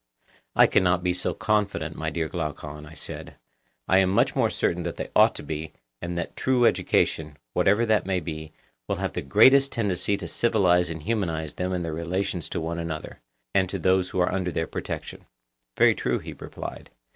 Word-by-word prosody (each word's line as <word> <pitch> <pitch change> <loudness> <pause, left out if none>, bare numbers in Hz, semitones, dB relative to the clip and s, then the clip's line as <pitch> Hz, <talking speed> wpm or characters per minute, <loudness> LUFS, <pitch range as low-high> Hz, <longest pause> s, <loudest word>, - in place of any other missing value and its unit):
I - - +8
cannot 90 -1 +2
be 90 -1 +2
so 90 - -2
confident, 105 -2 0
my 80 0 -2
dear 80 +1 -2
Glaucon, 75 -2 -5
I 80 - -12
said; - - -7 0.5
I 95 - +5
am 95 -1 +3
much 95 - +2
more - - +3
certain 90 - 0
that 85 0 -4
they - - -5
ought - - +6
to - - -6
be, 75 +1 -5 0.3
and 85 0 -4
that 85 - -4
true 125 -2 +2
education, 75 -8 +1 0.2
whatever 105 +4 +3
that 110 -3 +2
may 95 -1 +1
be, 80 -2 -6 0.4
will - - 0
have - - -3
the - - -2
greatest 130 - +5
tendency 100 -2 0
to 95 -4 -6
civilize 90 -5 +2
and 80 -2 -6
humanize 85 -8 -2
them 90 +1 -2
in 90 -1 -1
their 80 -1 -3
relations 85 +2 -2
to 90 - -3
one 85 +1 -3
another, 80 -2 -5 0.3
and 95 -2 +2
to 100 - -3
those 95 +1 +2
who 95 - -3
are 90 - +2
under 95 -2 -1
their 80 - -1
protection. - - -6 0.5
Very - - +6
true, - - -1
he - - -8
replied. - - -8
90 Hz, 195 wpm, -26 LUFS, 80-95 Hz, 0.5 s, I